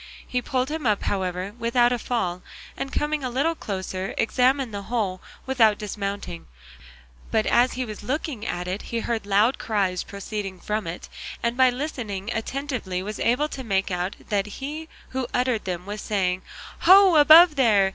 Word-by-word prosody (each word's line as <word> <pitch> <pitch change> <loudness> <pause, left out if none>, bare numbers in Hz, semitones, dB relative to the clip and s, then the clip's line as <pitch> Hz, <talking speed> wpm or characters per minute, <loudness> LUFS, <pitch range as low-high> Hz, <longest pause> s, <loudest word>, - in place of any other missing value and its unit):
He 250 - -1
pulled 255 +1 -1
him 310 -5 -2
up, 210 -2 +1
however, 185 0 -2
without 240 +1 +3
a 245 - 0
fall, 185 -9 -2 0.3
and 270 0 -4
coming 295 -1 -1
a 255 - -1
little 280 +7 +1
closer 190 - -4
examined 255 0 +2
the 200 - -4
hole 205 -6 -1 0.2
without 225 -6 +4
dismounting; 200 - -5 0.8
but 220 -1 +1
as 245 +1 +3
he 255 0 -2
was 215 -2 -8
looking 265 0 -3
at 180 -5 -3
it 185 +3 -3
he 230 -1 -3
heard 225 -3 -2
loud 210 +6 +3
cries 195 -5 0
proceeding 200 -1 -6
from 210 +1 -2
it, 165 +2 -6 0.4
and 235 0 0
by 260 0 +5
listening 240 -7 -4
attentively 225 -6 -3
was 210 +1 -5
able 255 +6 +2
to 265 - -6
make 195 -4 0
out 180 +2 -2
that 205 -1 0
he 305 +4 -6 0.2
who 260 -1 -3
uttered 250 -3 +1
them 180 -1 -4
was 210 +1 -5
saying, 185 -3 0 0.4
"Ho, 375 +1 +7
above 315 +2 +8
there! 210 -8 +4
225 Hz, 170 wpm, -24 LUFS, 195-260 Hz, 0.8 s, above